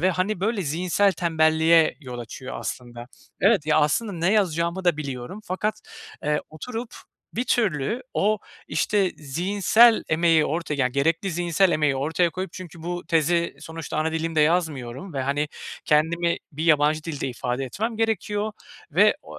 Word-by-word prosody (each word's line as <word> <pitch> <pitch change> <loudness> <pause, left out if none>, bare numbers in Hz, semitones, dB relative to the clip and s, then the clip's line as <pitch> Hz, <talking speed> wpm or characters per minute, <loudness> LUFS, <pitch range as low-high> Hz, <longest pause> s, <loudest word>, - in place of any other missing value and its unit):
ve, 185 +2 +3
hani, 185 +1 -1
böyle, 210 -1 0
zihinsel 180 +6 +1
tembelliğe 160 -1 +3
yol 125 -4 -7
açıyor 130 +3 -7
aslında. 120 -1 -6 0.3
Evet, 195 -6 +3
ya, 155 - +4
aslında 200 +8 +1
ne 175 +3 +1
yazacağımı 180 -2 0
da 175 -4 +3
biliyorum 140 +6 -6
fakat, 205 +4 -2 0.4
eee, 150 0 +1
oturup 225 +9 -6 0.4
bir 240 - -1
türlü 220 - 0
o, 215 +2 +2 0.3
işte, 200 -3 +1
zihinsel 195 - +3
emeği 160 0 +3
orta 160 -1 -2
yani, 130 -3 0
gerekli 165 +7 +1
zihinsel 175 +2 +2
emeği 150 -3 +2
ortaya 160 +5 +1
koyup 185 +4 -5
Çünkü 175 -3 -10
bu 175 +1 -4
tezi 170 +1 +1
sonuçta 160 -1 -6
ana 160 +1 0
dilimde 160 -1 0
yazmıyorum 150 -1 0
ve, 135 - -1
hani, 145 +2 -1 0.4
kendimi 170 +3 +2 0.2
bir 155 +3 -4
yabancı 155 -1 +3
dilde 145 -5 -3
ifade 125 +2 -3
etmem 220 - -3
gerekiyor. 215 -1 -1 0.4
Ve, - - +5
ooo, - - -11
165 Hz, 150 wpm, -24 LUFS, 150-190 Hz, 0.4 s, Ve